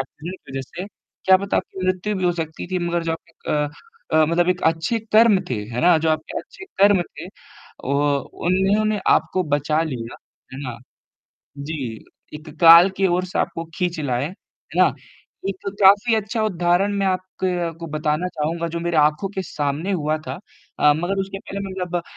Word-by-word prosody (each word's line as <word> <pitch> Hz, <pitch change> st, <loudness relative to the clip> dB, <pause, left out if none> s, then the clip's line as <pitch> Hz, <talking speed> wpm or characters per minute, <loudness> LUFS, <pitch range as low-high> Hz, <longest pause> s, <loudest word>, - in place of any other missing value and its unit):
Accident 160 Hz, +7 st, -7 dB
की 135 Hz, -, -11 dB
वज़ह 135 Hz, -, -3 dB
से। 185 Hz, -, -4 dB, 0.4 s
क्या 190 Hz, 0 st, +7 dB
पता 200 Hz, +1 st, -2 dB
आपकी 185 Hz, -1 st, -3 dB
मृत्यु 185 Hz, +3 st, 0 dB
भी 185 Hz, -, -2 dB
हो 175 Hz, -, +3 dB
सकती 160 Hz, +1 st, -5 dB
थी 185 Hz, -, 0 dB
मगर 170 Hz, 0 st, 0 dB
जो 165 Hz, 0 st, -1 dB
आपके 165 Hz, 0 st, -7 dB
अ 150 Hz, -1 st, +1 dB, 0.4 s
अ, 155 Hz, 0 st, +5 dB
मतलब 170 Hz, +2 st, +2 dB
एक 180 Hz, 0 st, +1 dB
अच्छे 165 Hz, +8 st, +1 dB
कर्म 215 Hz, -3 st, +6 dB
थे, 125 Hz, -, +1 dB
है 120 Hz, +1 st, -3 dB
ना? 175 Hz, -1 st, +5 dB
जो 160 Hz, -, 0 dB
आपके 155 Hz, 0 st, -2 dB
अच्छे 410 Hz, -, -11 dB, 0.2 s
कर्म 200 Hz, -1 st, +6 dB
थे -, -, -10 dB, 0.6 s
औ 135 Hz, -, -1 dB, 0.6 s
उन्होंने 205 Hz, +3 st, +2 dB
आपको 185 Hz, -, +2 dB
बचा 150 Hz, +2 st, +1 dB
लिया, 120 Hz, -7 st, -5 dB, 0.4 s
है 130 Hz, -, -7 dB
ना? 125 Hz, -3 st, -5 dB, 0.8 s
जी, 140 Hz, -6 st, -5 dB, 0.3 s
एक 155 Hz, +1 st, -9 dB
काल 170 Hz, +3 st, +9 dB
के 195 Hz, 0 st, +3 dB
ओर 185 Hz, -, -1 dB
आपको 165 Hz, -, -1 dB
खींच 175 Hz, -3 st, -1 dB
लाए, 130 Hz, -2 st, -1 dB
है 185 Hz, -, -7 dB
ना? -, -, +4 dB, 0.6 s
एक 195 Hz, 0 st, -4 dB
काफ़ी 205 Hz, +4 st, +6 dB
अच्छा 220 Hz, +1 st, -1 dB
उदाहरण 180 Hz, 0 st, +1 dB
मैं 195 Hz, -, +1 dB
आपके 185 Hz, -2 st, -2 dB
को 165 Hz, -, -6 dB
बताना 155 Hz, +3 st, 0 dB
चाहूँगा 165 Hz, +1 st, -2 dB
जो 170 Hz, +1 st, -4 dB
मेरे 170 Hz, -1 st, -1 dB
आँखों 150 Hz, +5 st, +3 dB
के 190 Hz, -, -2 dB
सामने 150 Hz, +3 st, -2 dB
हुआ 155 Hz, -3 st, 0 dB
था। -, -, -5 dB, 0.4 s
अ, 150 Hz, -, +6 dB
मगर 190 Hz, +4 st, -1 dB
उसके 195 Hz, 0 st, -4 dB
पहले 200 Hz, 0 st, -7 dB
मतलब 180 Hz, -2 st, -3 dB
175 Hz, 180 wpm, -22 LUFS, 155-190 Hz, 0.8 s, काल